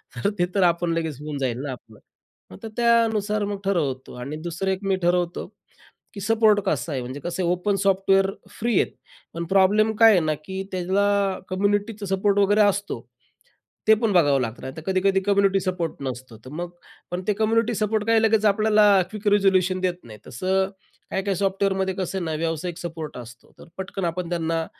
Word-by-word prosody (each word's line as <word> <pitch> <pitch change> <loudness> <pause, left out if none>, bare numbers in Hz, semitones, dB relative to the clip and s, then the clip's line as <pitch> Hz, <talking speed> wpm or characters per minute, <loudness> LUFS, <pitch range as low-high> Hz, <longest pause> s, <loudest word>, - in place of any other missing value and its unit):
तर 120 +11 0
ते 175 - +4
तर 195 - +3
आपण 170 -1 +2
लगेच 160 -4 -2
होऊन 150 -1 -5
जाईल 125 -3 -2
ना 145 - -4
आपलं. 115 -4 -12 0.5
मग - - -10
तर 225 - -5
त्यानुसार 225 -3 +2
मग 200 -1 -4
ठरवतो. 145 -9 -1
आणि 140 +5 -5
दुसरं, 170 +3 -2
एक 190 - -2
मी 195 -1 +1
ठरवतो, 175 0 0 0.7
की 200 - -7
सपोर्ट 215 0 +3
कसा 170 - -1
आहे. 135 - -2
म्हणजे 130 +3 -7
कसं 175 +4 -3
आहे, 175 0 +2
ओपन 180 +3 0
सॉफ्टवेअर 195 0 +3 0.2
फ्री 235 +1 -2
आहेत, - - -1 0.4
पण 170 +1 -3
प्रॉब्लेम 200 +4 +3
काय 225 +1 +7
आहे 185 - +4
ना, 155 -1 0
की 190 +2 -4
त्याला 195 +1 +1
कम्युनिटीचा 205 +2 -1
सपोर्ट 200 +1 +1
वगैरे 205 +1 +3
असतो, 205 0 0 0.9
ते 220 - +9
पण 220 -3 +2
बघावं 145 -6 +4
लागतं. 115 -2 -4
नाहीतर 130 +4 -7
कधी-कधी 190 0 +2
कम्युनिटी 200 -1 +3
सपोर्ट 180 -3 -2 0.2
नसतो, 125 -2 -8
तर 130 - -10
मग 175 0 -4 0.4
पण 180 +1 -3
ते - - +4
कम्युनिटी 230 +2 +2
सपोर्ट 215 0 0
काय 225 0 +4
लगेच 220 -1 +3
आपल्याला 215 0 +4 0.2
क्विक 215 -1 -3
रिझोल्यूशन 185 -2 +2
देत 185 -1 0
नाहीत. 110 -2 -12
तसं 190 +8 0 0.4
काही-काही 195 0 -1
सॉफ्टवेअरमध्ये 190 0 0
कसं 190 0 -3
आहे 180 - -3
ना, 160 -1 -2
व्यावसायिक 165 +1 -3
सपोर्ट 165 -3 -6
असतो, 120 0 -12
तर - - -14
पटकन 190 0 -4
आपण 170 +1 -2
त्यांना 165 -1 -1
190 Hz, 185 wpm, -24 LUFS, 165-205 Hz, 0.9 s, ते